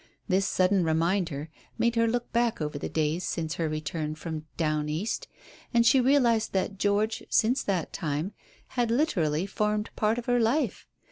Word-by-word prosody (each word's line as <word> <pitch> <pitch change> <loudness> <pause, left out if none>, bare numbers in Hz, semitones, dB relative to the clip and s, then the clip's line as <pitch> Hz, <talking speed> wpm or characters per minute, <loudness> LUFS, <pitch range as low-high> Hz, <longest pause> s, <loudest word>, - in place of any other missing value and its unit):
This 190 +1 +2
sudden 185 0 +3
reminder 165 -2 0 0.3
made 235 0 +2
her 230 0 +3
look 240 +1 -2
back 235 -1 +1
over 150 -2 -3
the - - -4
days 160 +3 0
since 160 -2 -2
her 160 +1 -1
return 155 0 -3
from 155 -1 -6
"down 155 -2 0
East," 205 - -2 0.5
and 235 0 +5
she 260 +2 +6
realized 245 -4 +3
that 195 0 -1
George, 205 +2 +1
since 245 +5 +3
that 185 -5 -2
time, 160 +3 -2 0.4
had 245 -3 0
literally 185 - +1
formed 210 +1 -1
part 215 +2 +1
of 240 - -4
her 245 0 +2
life. 240 +7 0
195 Hz, 165 wpm, -28 LUFS, 160-230 Hz, 0.5 s, she